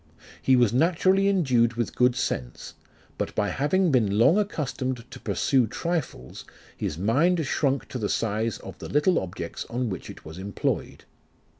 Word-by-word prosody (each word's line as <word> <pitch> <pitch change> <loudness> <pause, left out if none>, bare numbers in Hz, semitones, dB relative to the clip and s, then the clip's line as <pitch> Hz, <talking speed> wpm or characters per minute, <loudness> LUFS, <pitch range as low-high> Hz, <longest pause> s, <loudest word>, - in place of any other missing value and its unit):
He 130 - +4
was 120 -3 +3
naturally 185 +7 +3
endued 125 -11 +2
with 120 -1 -2
good 125 0 +3
sense; 65 - -3 0.5
but - - -3
by 105 -1 +1
having 175 +5 +1
been 110 -6 +2
long 120 - +5
accustomed 130 - -3
to - - -9
pursue 130 -4 +1
trifles, 150 - -4 0.3
his 75 - -3
mind 150 - +2
shrunk 135 -1 0
to 130 - -5
the 105 -2 -2
size 110 0 -1
of - - -11
the - - -7
little 160 +5 +3
objects 85 -2 -6
on 120 -1 -2
which 95 - -6
it - - -11
was 80 +3 -9
employed. 100 +1 -3
125 Hz, 160 wpm, -26 LUFS, 105-155 Hz, 0.5 s, long